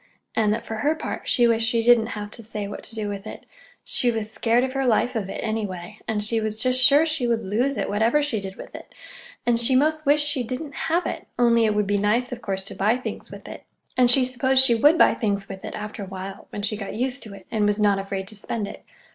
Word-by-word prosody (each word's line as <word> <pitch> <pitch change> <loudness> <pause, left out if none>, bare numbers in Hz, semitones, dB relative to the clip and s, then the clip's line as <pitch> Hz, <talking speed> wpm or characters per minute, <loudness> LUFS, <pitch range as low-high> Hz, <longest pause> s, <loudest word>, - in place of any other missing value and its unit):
and 215 -2 +2
that, 220 +2 -2
for 225 - -5
her 295 +8 +1
part, - - -6
she 240 -2 +4
wished 225 -1 +2
she 230 -1 +1
didn't 235 -1 +5
have 205 0 -6
to 230 - -10
say 210 -2 -5
what 200 - -7
to 230 - -10
do 215 -2 -3
with 200 -1 -6
it. - - -9 0.4
She 245 - +1
was 220 -2 -2
scared 235 +2 +2
of 260 0 -2
her 270 -1 0
life 240 +2 +2
of 200 -4 -2
it, - - -5
anyway, 210 -3 -4
and 210 -1 0
she 225 +1 0
was 215 0 -3
just 255 +2 +3
sure 285 +4 +6
she 305 -6 0
should 230 -1 0
lose 245 +8 0
it, - - -1
whatever 225 +7 +2
she 285 -8 -1
did 190 -1 -7
with - - -11
it; - - -11 0.5
and 235 -1 +3
she 240 +2 +4
'most 310 +3 +2
wished 295 +1 +4
she 285 -3 0
didn't 260 +5 -5 0.2
have 340 +2 +1
it, - - -5
only 235 -1 +4
it 215 -1 +1
would 210 -1 +1
be 205 +1 +1
nice, 225 +5 +1
of 245 -1 -6
course, 195 -3 -3
to 195 - -6
buy 215 +5 +1
things 255 - -7
with - - -11
it—and 250 -1 -2
she 255 +1 +5
supposed 260 +1 +3
she 240 - +4
would 295 +8 +5
buy - - +6
things 200 -3 -2
with 190 -1 -9
it, - - -6
after 210 0 -6
a 195 - -6
while, 190 +1 -8
when 205 - -6
she 215 - +1
got 200 -2 -6
used 255 +3 -1
to 210 -3 -9
it, 190 -2 -14
and 215 -2 +1
was 210 +1 +1
not 205 -2 +3
afraid 195 -1 -4
to 215 - -8
spend 210 +1 -4
it. - - -10
225 Hz, 265 wpm, -24 LUFS, 205-255 Hz, 0.5 s, sure